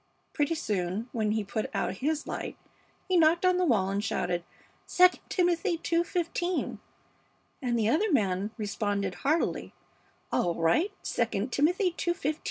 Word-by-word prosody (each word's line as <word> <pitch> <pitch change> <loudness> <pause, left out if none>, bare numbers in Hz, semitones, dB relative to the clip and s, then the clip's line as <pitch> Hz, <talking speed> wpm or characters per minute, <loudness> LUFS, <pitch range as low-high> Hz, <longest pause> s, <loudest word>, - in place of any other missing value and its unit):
Pretty 295 +2 +1
soon, 205 - -2
when 215 -2 0
he 220 -1 0
put 215 +2 -3
out 190 - -1
his 300 +4 -1
light, - - -5 0.5
he 370 -2 +3
knocked 335 +2 +4
on 365 0 +4
the 365 - +2
wall 200 - +2
and 200 +1 -1
shouted 175 -4 -1 0.6
'II 365 0 +10 0.2
Timothy 350 0 +1
ii:15,' 345 +1 -1 0.8
and 245 -3 0
the 220 -2 +2
other 360 - +2
man 200 - +1
responded, 205 -2 -1
heartily, 310 +4 0 0.6
'All 175 -1 +1
right, 165 - +2 0.3
II 230 -1 0
Timothy 350 +7 +2
ii:15.' 310 -4 -1
270 Hz, 140 wpm, -29 LUFS, 205-340 Hz, 0.8 s, II